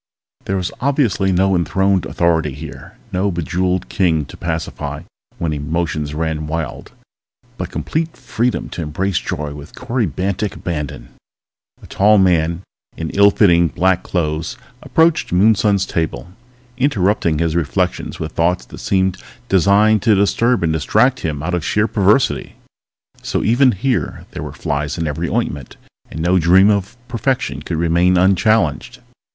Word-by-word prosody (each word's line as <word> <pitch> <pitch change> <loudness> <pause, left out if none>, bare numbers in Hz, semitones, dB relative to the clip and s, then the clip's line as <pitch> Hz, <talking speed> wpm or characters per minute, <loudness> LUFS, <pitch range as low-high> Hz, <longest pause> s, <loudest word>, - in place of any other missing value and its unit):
There 95 - -1
was 90 -1 -2
obviously 125 -8 +1
no 95 +1 +2
enthroned 95 +2 +1
authority 80 -5 0
here, 75 +1 -10
no 95 +2 0
bejeweled 90 +1 -1
king 80 -5 +1
to - - -12
pacify 80 -1 -4 0.3
when 80 -2 -2
emotions 75 0 -2
ran 80 -1 -2
wild, 80 -2 -5 0.6
but - - -5
complete 160 0 -3
freedom 120 +2 -2
to - - -6
embrace 90 +5 -1
joy 75 0 -4
with 75 0 -11
corybantic 100 - -2
abandonment. 75 -5 -5 0.7
A - - -10
tall 105 +2 +3
man 85 -2 +2 0.3
in 80 -1 -4
ill 100 +1 +6
fitting 85 -5 +4
black 95 +2 +1
clothes 80 -2 -2 0.2
approached 160 0 +2
Moonson's 100 +1 +3
table, 80 -3 -3 0.5
interrupting 105 - +1
his 80 0 0
reflections 90 +2 -1
with 80 -2 -4
thoughts 90 +2 0
that - - -12
seemed 95 -1 0 0.3
designed 100 +3 +4
to 110 0 +4
disturb 100 +3 +2
and 80 -1 +1
distract 125 - +2
him 75 -3 -3
out 90 +2 -2
of 90 -3 -1
sheer 105 +5 +1
perversity. 105 +4 +1 0.7
So - - -2
even 125 +4 +4
here 120 +6 -2
there - - -6
were - - -6
flies 70 -1 -3
in 85 - -2
every 80 +3 -3
ointment, 75 - -3 0.3
and 80 - -6
no 90 +2 +3
dream 95 +5 +5
of 100 +3 -2
perfection 130 +2 -2
could 85 - -4
remain 85 +2 +2
unchallenged. 95 -2 +2
90 Hz, 145 wpm, -18 LUFS, 80-100 Hz, 0.7 s, ill